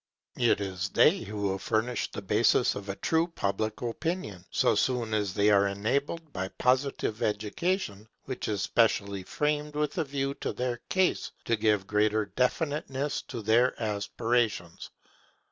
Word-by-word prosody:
It 120 -4 +3
is 95 -1 -3
they 180 - +5
who 105 - -5
will 95 -1 0
furnish 110 +4 -1
the 105 - -7
basis 110 +5 +3
of 100 0 -7
a 100 - -2
true 165 +8 +1
public 110 - -2
opinion, 120 - -3
so - - +3
soon 120 -4 0
as 105 -3 0
they 105 +1 +4
are 100 -1 +5
enabled 140 +10 -2
by 95 0 -2
Positive 130 -1 0
education, 105 - -1 0.2
which 130 -1 -4
is 100 -2 -1
specially 100 -3 +2
framed 150 +8 -1
with 150 +3 -1
a - - +3
view 140 -1 -2
to - - -2
their 125 -1 -2
case, 185 -1 +1
to 115 - +2
give 105 -3 +2
greater 105 +1 +2
definiteness 140 - -1
to 120 -4 -6
their 120 +4 +3
aspirations. 105 -3 -1
110 Hz, 150 wpm, -29 LUFS, 100-140 Hz, 0.2 s, they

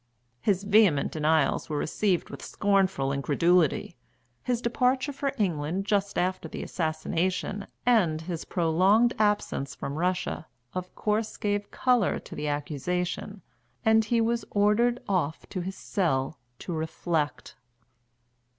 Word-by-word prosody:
His 195 +4 +1
vehement 200 -8 +4
denials 155 -1 +1
were 150 - -1
received 180 +4 0
with - - -8
scornful 190 -9 +1
incredulity, 155 +3 +2 0.5
his 245 -2 -1
departure 255 +4 +1
for 275 0 -1
England 180 -2 -1
just 200 -1 0
after 185 +1 -1
the - - -5
assassination, 180 +4 -2 0.2
and 195 -11 +3
his 165 0 -5
prolonged 190 +8 +3
absence 205 -10 0
from 140 +3 -5
Russia, 180 -2 -1 0.3
of 185 0 -5
course 215 +1 -1
gave 205 0 -1
colour 250 -6 +2
to - - -10
the 150 - -3
accusation, 175 +7 -3 0.4
and 220 0 +5
he 230 +2 +2
was 230 0 +1
ordered 210 +4 +3
off 170 -6 -1
to 185 - -3
his 190 +2 -5
cell 150 - -1 0.2
"to 175 - -6
reflect." 160 -1 -2
185 Hz, 125 wpm, -27 LUFS, 160-210 Hz, 0.5 s, and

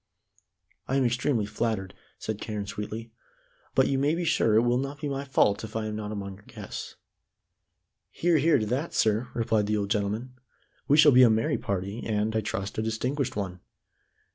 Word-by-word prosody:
"I 135 - 0
am 135 -2 +3
extremely 120 -1 +1
flattered," 105 -3 -2 0.2
said 110 -2 -5
Carne 105 -2 -4
sweetly, 105 +2 -6 0.7
"and 130 - +5
you 135 - +1
may 145 +4 +2
be 175 0 -2
sure 115 -9 +3
it 110 - +5
will 120 +1 +2
not 140 +2 -4
be 150 - -3
my 140 0 -3
fault 105 -6 +2
if 110 0 -8
I 110 -1 -1
am 105 0 -3
not 105 -1 -4
among 100 -2 -5
your 100 - -20
guests." - - -7 1.1
"Hear, 170 -2 +2
hear, 155 +1 +4
to 110 - -1
that, 130 +9 -2
sir," 110 +3 +2
replied 110 -3 +1
the 105 0 +1
old 100 -1 -2
gentleman. 110 +4 -1 0.5
"We 145 - +5
shall 150 -1 +8
be 130 0 +7
a 125 - +8
merry 110 +1 +1
party, 100 +3 -3
and, 110 0 -1
I 110 - +2
trust, 105 -1 -4
a - - +2
distinguished 125 +5 -2
one. 95 -3 -4
110 Hz, 190 wpm, -27 LUFS, 105-130 Hz, 1.1 s, shall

